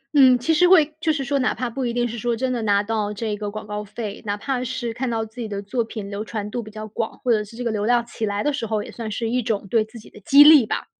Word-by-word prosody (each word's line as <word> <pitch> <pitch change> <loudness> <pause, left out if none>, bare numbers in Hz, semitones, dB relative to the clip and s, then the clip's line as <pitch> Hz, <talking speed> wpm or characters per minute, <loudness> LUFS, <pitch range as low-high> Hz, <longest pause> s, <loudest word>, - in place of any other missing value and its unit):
嗯， 260 -3 +7
其 320 +7 +1
实 355 +3 +5
会 315 -5 +5
就 320 -1 +1
是 285 -2 -2
说 280 +1 0
哪 255 - +1
怕 250 -1 -3
不 260 +2 -3
一 235 - -1
定 240 0 +1
是 235 0 -4
说 235 +1 -1
真 255 +2 -1
的 245 -2 -2
拿 205 -1 +2
到 210 -1 -2
这 210 0 -3
个 210 0 -4
广 215 +1 -7
告 210 0 -4
费， 210 0 -6
哪 205 -1 -1
怕 250 +4 -3
是 250 -2 -3
看 250 +1 -3
到 225 -1 -1
自 220 +2 -11
己 230 - -3
的 200 -1 -4
作 230 +4 -2
品 215 -3 -7
流 205 +1 -5
传 210 -1 -5
度 240 +1 -3
比 215 - -10
较 215 0 -7
广， 220 +1 -4
或 245 - +2
者 215 - +3
是 210 - -14
这 245 - -5
个 235 - -1
流 210 -1 -1
量 240 +1 +2
起 230 -1 -4
来 205 0 -2
的 295 - +1
时 275 -5 -3
候， 215 -1 -1
也 - - -10
算 230 -2 -6
是 225 +2 -2
一 250 +2 +1
种 215 -3 -2
对 225 0 +2
自 220 +2 -13
己 - - -15
的 - - -15
激 280 +8 +7
励 295 -6 +8
吧。 - - -3
230 Hz, 345 characters per minute, -22 LUFS, 210-250 Hz, -, 励